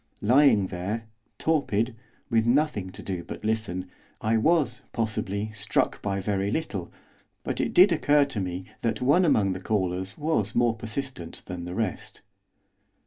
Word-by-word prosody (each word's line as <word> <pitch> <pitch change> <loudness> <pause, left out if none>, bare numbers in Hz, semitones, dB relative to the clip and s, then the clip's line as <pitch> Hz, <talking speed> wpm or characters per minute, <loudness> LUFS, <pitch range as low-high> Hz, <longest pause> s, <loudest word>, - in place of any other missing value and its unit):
Lying 120 -3 +5
there, 100 +6 -3 0.3
torpid, 125 -7 +1 0.3
with 115 -1 +2
nothing 125 -7 +2
to - - -10
do 90 -3 -4
but - - -8
listen, 105 -5 -1 0.3
I 110 +1 +1
was, 135 0 +2
possibly, 110 -2 -2
struck 105 0 0
by 100 -1 -1
very 100 0 -1
little, 110 - -3 0.5
but - - -2
it - - -1
did 185 +2 +7
occur 145 -3 +4
to 135 -6 -4
me 90 -1 -3 0.2
that 115 - 0
one 145 +9 +4
among 105 - +3
the 95 - -5
callers 95 -1 -1
was 145 -10 0
more 120 -1 +3
persistent 115 -5 -6
than 90 -1 -6
the 90 +1 -5
rest. 110 -5 -3
110 Hz, 150 wpm, -26 LUFS, 95-130 Hz, 0.5 s, did